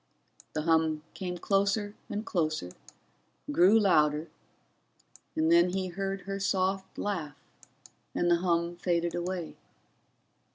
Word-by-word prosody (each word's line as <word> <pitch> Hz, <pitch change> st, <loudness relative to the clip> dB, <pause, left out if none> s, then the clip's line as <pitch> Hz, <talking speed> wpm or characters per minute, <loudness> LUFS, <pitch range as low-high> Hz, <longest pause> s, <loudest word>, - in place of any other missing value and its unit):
The 155 Hz, -, -2 dB
hum 160 Hz, -1 st, +2 dB
came 180 Hz, -2 st, -4 dB
closer 200 Hz, +2 st, +1 dB, 0.2 s
and 210 Hz, +2 st, -3 dB
closer, 155 Hz, -, -1 dB, 0.8 s
grew 185 Hz, +9 st, +6 dB
louder, 155 Hz, -5 st, +3 dB, 1.1 s
and 160 Hz, +1 st, +2 dB
then 170 Hz, +1 st, +6 dB
he 190 Hz, -1 st, -1 dB
heard 195 Hz, +2 st, -3 dB
her 195 Hz, +1 st, -4 dB
soft 190 Hz, 0 st, -1 dB
laugh 170 Hz, -8 st, -3 dB, 0.8 s
and 175 Hz, -, +1 dB
the 170 Hz, -, +5 dB
hum 170 Hz, -1 st, 0 dB
faded 170 Hz, -1 st, 0 dB
away. 175 Hz, -1 st, -4 dB
175 Hz, 115 wpm, -29 LUFS, 165-195 Hz, 1.1 s, grew